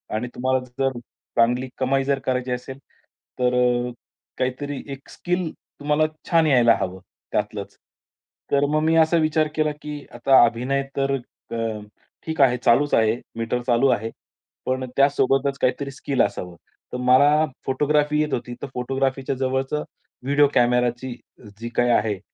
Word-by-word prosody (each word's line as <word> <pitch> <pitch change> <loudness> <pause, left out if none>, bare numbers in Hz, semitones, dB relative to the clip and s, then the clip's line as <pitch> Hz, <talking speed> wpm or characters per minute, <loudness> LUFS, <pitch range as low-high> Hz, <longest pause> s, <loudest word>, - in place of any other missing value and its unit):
आणि 120 +3 -2
तुम्हाला 130 +1 +1 0.2
जर 135 -2 0 0.4
चांगली 125 +3 +3
कमाई 135 +1 +1
जर 140 0 0
करायची 130 -1 -1
असेल, 125 +2 -5 0.6
तर 125 0 +2
अ, 125 0 +2 0.5
काहीतरी 130 +2 -3
एक 135 0 -12
स्किल 180 -2 -2 0.3
तुम्हाला 150 +1 +1 0.3
छान 165 -2 +4
यायला 120 -5 +5
हवं 95 0 -3 0.3
त्यातलंच. 105 -1 -3 0.7
तर 140 0 +3
मग 155 +1 +1
मी 160 +1 +3
असा 160 +1 +4
विचार 155 -1 +2
केला, 155 -1 +1
की 150 -1 -7
आता 135 -2 +5
अभिनय 125 +4 -1
तर 135 0 +1 0.4
अ, 115 -2 -2 0.5
ठीक 160 -2 -1
आहे, 125 -2 +5
चालूच 125 +4 +3
आहे. 110 0 +4 0.2
मीटर 115 +2 -1
चालू 120 +3 +4
आहे. 115 -2 0 0.6
पण 130 0 -1
त्यासोबतच 140 0 +2
काहीतरी 140 +2 0
स्किल 135 0 -1
असावं. 90 -3 -2 0.4
तर - - -2
मला 140 +5 +5 0.2
फोटोग्राफी 150 +2 +1
येत 150 - -1
होती. 120 0 -3
तर - - -4
फोटोग्राफीच्या 135 +1 -1
जवळचं 130 +3 -1 0.4
व्हिडिओ 145 +2 +4
कॅमेराची 125 0 +2 0.5
जी 115 - -5
काही 120 0 +3
आहे 105 -4 +1
130 Hz, 145 wpm, -23 LUFS, 125-145 Hz, 0.7 s, यायला